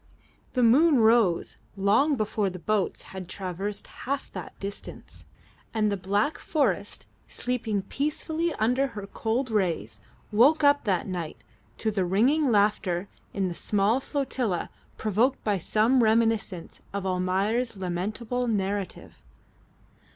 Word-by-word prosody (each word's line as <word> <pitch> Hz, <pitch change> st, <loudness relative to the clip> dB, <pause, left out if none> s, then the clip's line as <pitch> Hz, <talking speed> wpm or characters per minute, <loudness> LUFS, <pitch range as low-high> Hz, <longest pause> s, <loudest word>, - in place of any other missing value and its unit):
The 250 Hz, -, +2 dB
moon 280 Hz, +6 st, +6 dB
rose 220 Hz, -6 st, +3 dB, 0.2 s
long 210 Hz, +10 st, +3 dB
before 215 Hz, -3 st, 0 dB
the 180 Hz, -, -7 dB
boats 205 Hz, +1 st, -1 dB
had 185 Hz, -2 st, -7 dB
traversed 195 Hz, +2 st, -4 dB
half 275 Hz, +1 st, -5 dB
that 185 Hz, -4 st, -8 dB
distance, 200 Hz, +1 st, -8 dB, 0.5 s
and 215 Hz, -1 st, +2 dB
the -, -, +1 dB
black 205 Hz, +9 st, 0 dB
forest 220 Hz, -, -1 dB, 0.2 s
sleeping 225 Hz, -5 st, -2 dB
peacefully 315 Hz, -, -2 dB
under 250 Hz, +5 st, +2 dB
her 200 Hz, -, -4 dB
cold 230 Hz, +5 st, -2 dB
rays 165 Hz, -, -1 dB, 0.3 s
woke 275 Hz, +9 st, +5 dB
up 285 Hz, -2 st, +4 dB
that 190 Hz, -4 st, +1 dB
night 175 Hz, -5 st, -4 dB, 0.4 s
to 220 Hz, -, 0 dB
the 200 Hz, -3 st, 0 dB
ringing 245 Hz, -, +3 dB
laughter 200 Hz, -3 st, +1 dB, 0.2 s
in 195 Hz, -2 st, -1 dB
the 175 Hz, -, -3 dB
small 205 Hz, +6 st, +1 dB
flotilla 260 Hz, -, -2 dB, 0.3 s
provoked 225 Hz, +6 st, +1 dB
by 205 Hz, -3 st, +1 dB
some 225 Hz, +8 st, +3 dB
reminiscence 220 Hz, -5 st, +1 dB
of 200 Hz, -1 st, -4 dB
Almayer's 195 Hz, +6 st, 0 dB
lamentable 215 Hz, +7 st, -2 dB
narrative. 200 Hz, -3 st, -3 dB
210 Hz, 125 wpm, -27 LUFS, 190-245 Hz, 0.5 s, moon